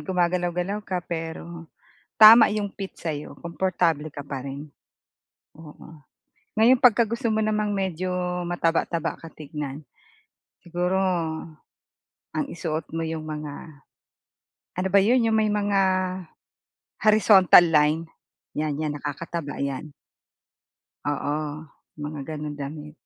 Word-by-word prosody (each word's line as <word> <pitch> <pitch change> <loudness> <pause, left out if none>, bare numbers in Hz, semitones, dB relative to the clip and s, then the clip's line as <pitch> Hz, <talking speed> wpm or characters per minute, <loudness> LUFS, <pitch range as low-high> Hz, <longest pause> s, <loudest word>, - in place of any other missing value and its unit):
gumagalaw-galaw 180 +2 0
ka, 180 -3 -4
pero 165 0 -6 0.5
tama 220 0 +10
yung 210 -1 -1
fit 195 0 -7
sa'yo, 150 -3 -4
komportable 170 -4 -1
ka 145 - -7
pa 140 -2 -6
rin. 140 +2 -7 0.9
Oo. 155 -1 -14 0.5
Ngayon 240 +3 +5
pagka 240 -2 +6
gusto 235 +3 -3
mo 220 0 +1
namang 210 -1 0
medyo 185 -1 -2 0.3
mataba-taba 165 -1 -1
ka 165 - -10
tignan, 150 -1 -6 0.8
siguro 180 +2 -1 1.3
ang 295 - -2
isuot 160 -2 -4
mo 165 - -1
yung 160 -1 -4
mga 150 -1 -8 1.0
ano 185 - 0
ba 200 - +8
'yon, 235 +2 +3
yung 220 - +2
may 215 -1 +2
mga 205 -1 +1 1.2
horizontal 210 -4 +7
line, 160 0 +2 0.5
'yan, 150 -1 -1
'yan, 150 -1 -2
nakakataba 145 0 -5
'yan. 140 +2 -4 1.2
Oo, 150 +1 -3 0.3
mga 150 -1 -6
ganung 150 -1 -5
damit. 150 +2 -7
165 Hz, 110 wpm, -25 LUFS, 150-195 Hz, 1.3 s, tama